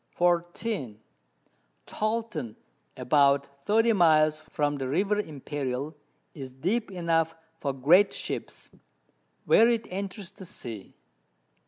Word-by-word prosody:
24. 175 - 0 0.9
Tolten, 215 - -3 0.4
about 140 0 +2
30 225 +2 +3
Miles 155 -4 +4
from 145 -1 0
the 135 - -2
River 200 +8 +1
Imperial, 145 -3 -4 0.4
is 135 -4 -8
deep 190 - -1
enough 165 -3 0 0.2
for 140 - -1
great 165 +10 +4
Ships, - - -5 0.7
where 230 +2 +6
it 230 -2 0
enters 195 0 -5
the 190 - -12
Sea. 110 - -8
165 Hz, 105 wpm, -27 LUFS, 140-200 Hz, 0.9 s, where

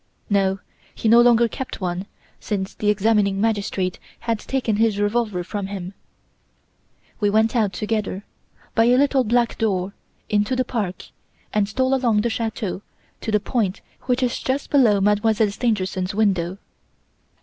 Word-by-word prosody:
No, 195 -1 +2 0.4
he - - -2
no 235 +2 +7
longer 235 -1 +5
kept 260 +3 -6
one, 180 +1 -3 0.3
since 195 -3 -3
the 210 - -1
examining 210 -1 +2
magistrate 200 -4 -1 0.2
had 230 -2 -1
taken 240 -5 -1
his 220 -2 +2
revolver 205 -3 0
from 200 +2 -4
him. 190 -1 -6 1.3
We 205 -2 +2
went 220 +3 +2
out 215 -4 +2
together, 210 -2 -2 0.5
by 225 - +4
a 245 +1 +5
little 275 -1 +3
back 235 +1 +1
door, 200 -3 0 0.3
into 210 +4 +1
the 255 0 0
park, 205 -7 -3 0.5
and 205 -1 +1
stole 260 +5 +1
along 235 -5 +2
the 235 +1 -1
chateau 220 -4 -3 0.4
to 220 - -3
the 210 - +3
point 210 -3 -1 0.2
which 255 0 +1
is 245 -1 0
just 270 +2 -2
below 230 -8 +4
Mademoiselle 210 +1 +2
Stangerson's 195 -4 -1
window. 190 -4 +1
210 Hz, 150 wpm, -22 LUFS, 200-235 Hz, 1.3 s, no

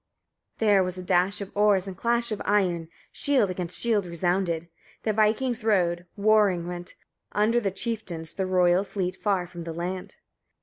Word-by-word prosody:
27. 220 -2 +2
There 195 -1 +5
was 180 0 -4
a 185 - -6
dash 185 +2 +2
of 200 - -8
oars, 205 -2 +3
and 190 -2 -6
clash 235 +1 +1
of 215 - -3
iron, 180 -5 +1 0.2
shield 260 -9 +1
against 180 -1 -5
shield 215 -5 0
resounded: 170 -1 -1 0.4
the 215 - +1
vikings 220 +3 +1
rowed; 180 -5 +1
roaring 205 -4 +3
went, 175 0 -6 0.4
under 215 +4 +3
the 205 -4 0
chieftains 190 -5 -4
the 190 -1 -2
royal 180 0 +3
fleet 190 -2 -3
far 195 -3 0
from 175 -1 -9
the 165 0 -5
land. 180 +2 -5
190 Hz, 170 wpm, -26 LUFS, 175-210 Hz, 0.4 s, There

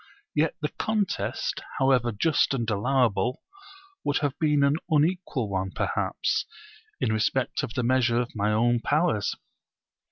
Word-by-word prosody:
yet 155 +1 +1
the 150 - +1
contest, 215 -3 -1 0.2
however 130 -3 +3
just 140 +6 +2
and 120 -3 -2
allowable, 120 +1 +1 0.6
would 145 - +1
have 145 -3 0
been 150 -2 +3
an 140 +1 +3
unequal 155 - +1
one 95 -1 -2
perhaps, - - -1 0.6
in 110 - +1
respect 115 +4 0
of 115 - -5
the 125 - 0
measure 120 -1 +2
of 120 -1 -3
my 105 0 +1
own 120 +2 +2
powers. 150 - +1
130 Hz, 135 wpm, -26 LUFS, 115-145 Hz, 0.6 s, however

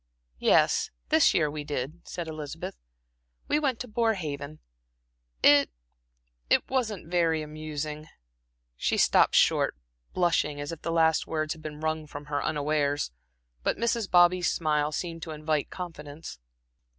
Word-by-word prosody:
"Yes, - - +3 0.2
this - - +5
year 155 - +3
we 150 0 -5
did," 145 +3 -4
said 175 -2 -5
Elizabeth. 155 - -6 0.7
"We 295 - +2
went 270 -6 0
to 250 - -5
Borehaven. 160 -11 -2 0.9
It 145 -1 +6 0.8
it - - +3
wasn't 225 -9 -1
very 165 -2 +1
amusing." 155 0 -5 0.7
She - - 0
stopped - - +4
short - - +4 0.4
blushing 165 -5 +1
as 145 +1 -4
if 165 - -8
the 165 - -3
last 160 -1 +3
words 155 -1 -1
had 160 - -14
been 155 -1 -7
wrung 155 -1 -2
from 145 0 -8
her 145 - 0
unawares; 145 - 0 0.5
but - - 0
Mrs. 230 -2 0
Bobby's 175 0 +5
smile 150 -2 0
seemed 165 +1 -4
to 160 - -6
invite 155 -1 -1
confidence. 155 - -8
155 Hz, 140 wpm, -28 LUFS, 150-175 Hz, 0.9 s, It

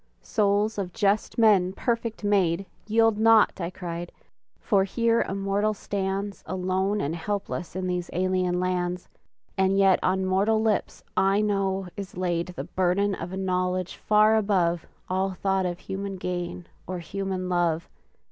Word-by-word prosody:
"Souls 210 0 +1
of 180 -3 -4
just 205 0 +1
men 200 -5 +4
perfect 230 0 -2
made," 195 -3 +2 0.2
"Yield 225 0 +3
not," 220 -3 +5
I 170 - -2
cried, 175 -1 -6 0.5
"for 200 -3 +2
here 230 +3 +1
a 195 - -2
mortal 200 +2 0
stands 195 0 -3
"Alone 190 +2 0
and 160 -2 -1
helpless 180 -1 -4
in 185 0 -2
these 180 -1 -2
alien 185 0 0
lands; 180 -1 -1 0.5
"And 190 0 +3
yet 195 -1 +5
on 190 +1 +1
mortal 200 +4 +2
lips, 220 -2 -1
I 195 +1 +3
know, 195 -2 0
is 195 -3 -7
laid 175 -1 -1
"The 180 -7 -6
burden 185 +4 +1
of 180 - -5
a 190 - -4
knowledge 185 -1 -1
far 215 +1 +4
above 180 -5 +1 0.2
"All 190 +1 0
thought 190 0 0
of 175 -1 -3
human 195 0 -4
gain 180 -1 -4 0.2
or 185 - -3
human 190 +1 -4
love!" 170 -2 0
190 Hz, 150 wpm, -26 LUFS, 180-205 Hz, 0.5 s, not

